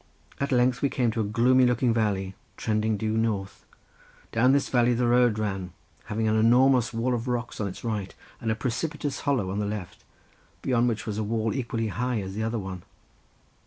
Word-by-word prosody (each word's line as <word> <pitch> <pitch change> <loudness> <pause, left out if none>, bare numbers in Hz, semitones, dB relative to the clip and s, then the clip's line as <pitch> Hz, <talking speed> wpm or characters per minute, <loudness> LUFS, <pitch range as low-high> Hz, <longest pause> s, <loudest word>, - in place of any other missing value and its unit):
At 140 - -1
length 125 0 +2
we 140 - +2
came 125 -4 +1
to 110 - -1
a - - 0
gloomy 125 +5 +4
looking 125 0 +2
valley 100 -4 0 0.2
trending 110 0 0
due 110 +1 -1
north; 110 -4 -2 0.6
down 125 +3 +4
this 140 0 +2
valley 120 -1 +3
the 125 +1 +1
road 120 -2 +4
ran 95 -4 -3 0.3
having 110 +1 -1
an 110 - +2
enormous 125 +2 +4
wall 120 +2 0
of 120 +1 -2
rocks 120 -2 -3
on 100 - 0
its 95 - -8
right 105 -5 -3 0.2
and 115 - -3
a 110 - +1
precipitous 140 +5 -3
hollow 110 -10 +1
on 100 - -2
the 105 - -1
left, 105 -4 -6 0.6
beyond 125 -2 +2
which 110 -3 -2
was 110 -1 -3
a - - 0
wall 110 +1 -1
equally 115 -4 -2
high 125 +2 -1
as 95 -1 -5
the 105 - -3
other 115 +1 -1
one. 95 -3 -5
115 Hz, 200 wpm, -26 LUFS, 105-125 Hz, 0.6 s, gloomy